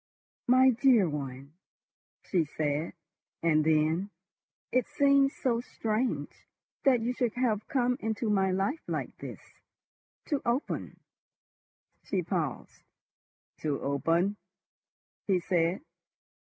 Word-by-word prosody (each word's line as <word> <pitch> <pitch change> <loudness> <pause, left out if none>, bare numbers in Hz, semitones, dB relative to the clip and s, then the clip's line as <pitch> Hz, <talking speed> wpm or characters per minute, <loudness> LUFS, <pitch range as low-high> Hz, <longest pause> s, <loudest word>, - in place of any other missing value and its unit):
"My 260 +1 +6
dear 240 -5 +4
one!" 140 -2 -6 0.7
she 180 -4 +1
said, 150 +1 -2 0.5
and 155 -2 +4
then: 160 +5 +2 0.6
"It 255 - +2
seems 280 -1 +3
so 235 -3 0
strange—that 245 +2 -2
you 240 +2 -1
should 245 -3 -1
have 230 -5 0
come 250 -4 +1
into 220 +1 -2
my 195 -2 +2
life 195 - 0
like - - -3
this—to 290 -3 -9
open—" 245 +4 -2 1.0
She 185 -3 -1
paused. 160 - -3 0.8
"To 150 -3 -1
open?" 165 +8 +1 0.9
he 190 -3 +3
said. 175 +2 0
200 Hz, 100 wpm, -29 LUFS, 160-250 Hz, 1.0 s, My